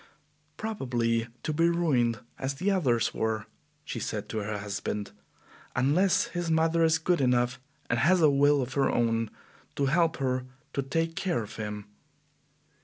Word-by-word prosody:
"Probably 120 - -1 0.2
to 155 - -1
be 165 +3 +3
ruined 130 -10 +1 0.2
as 135 +1 -2
the 185 +8 0
others 130 - +1
were," 110 -2 -1 0.4
she - - -4
said - - -4
to 110 - -2
her 105 0 -3
husband, 100 0 -4 0.6
"unless 155 +9 +3
his 175 -1 -3
mother 165 +1 +3
is 160 0 +4
good 170 0 +1
enough 125 -1 +2 0.3
and - - +1
has 180 +7 +4
a 155 -3 +6
will 140 0 +4
of 125 +1 -6
her 135 -1 +2
own 115 -1 +1 0.5
to 140 - +1
help 165 +4 +2
her 130 -1 -1 0.3
to 140 - 0
take 165 +5 -1
care 175 - -1
of 105 - -10
him." 105 -1 -5
135 Hz, 160 wpm, -28 LUFS, 115-165 Hz, 0.6 s, a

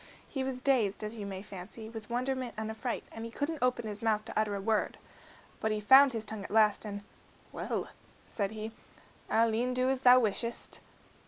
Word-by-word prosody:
He 270 - -3
was 260 -1 -3
dazed, 235 -8 +2
as 215 +2 -4
you 205 -3 -5
may 190 -1 -5
fancy, 205 +3 -8
with 225 -1 -8
wonderment 255 0 -2
and 220 0 -3
affright, 230 +2 -3
and 225 - -7
he 230 - -5
couldn't 290 +5 -3
open 250 -2 +1
his 210 -1 -5
mouth 215 -2 +1
to 225 - -7
utter 215 -1 +1
a - - -3
word. 215 +2 0 0.6
But 220 - 0
he 215 - 0
found 265 +6 +8
his 225 -1 -3
tongue 215 -2 -5
at - - -7
last, 215 0 +4
and, 205 -1 -5 0.5
"Well," - - -3 0.4
said 200 -3 -2
he, 220 +1 -6 0.6
"I'll 225 0 +3
e'en 250 +3 0
do 255 +1 +2
as 265 -1 -1
thou 250 -1 +8
wishest." 230 +1 -1
225 Hz, 200 wpm, -31 LUFS, 215-250 Hz, 0.6 s, found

